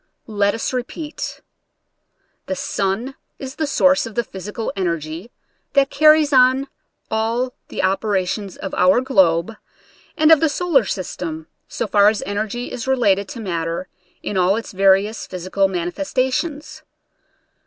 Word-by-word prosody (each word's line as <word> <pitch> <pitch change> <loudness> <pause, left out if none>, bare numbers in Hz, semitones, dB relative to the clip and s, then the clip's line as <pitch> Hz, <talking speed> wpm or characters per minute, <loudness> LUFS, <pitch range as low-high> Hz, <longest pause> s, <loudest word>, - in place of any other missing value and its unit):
Let 205 -2 0
us 225 - -3
repeat: 295 +5 -5 1.1
the 190 - -2
sun 200 +8 -2 0.2
is 265 -1 -8
the 310 - -1
source 280 -1 +3
of 225 - -11
the 235 - +1
physical 210 +3 -6
energy 170 +1 -3 0.4
that 275 -1 +3
carries 305 0 +5
on 260 +1 +4 0.4
all 230 +3 -1
the - - -4
opera 195 0 +1
tions 195 0 -5
of 195 - -6
our 185 +5 +4
globe 190 -8 +2 0.7
and 310 +1 +5
of 320 - +8
the 320 - +2
solar 295 - +2
system, 165 -4 -5 0.2
so - - -3
far 205 0 +5
as 215 - -2
energy 215 +4 -3
is 245 +1 -5
related 200 -7 +2
to 235 - -7
matter 170 -3 -3 0.3
in 205 - -3
all 185 +2 +3
its 225 - -5
various 195 +2 +2
physical 185 +2 0
manifestations. 260 - -2
215 Hz, 140 wpm, -20 LUFS, 190-265 Hz, 1.1 s, of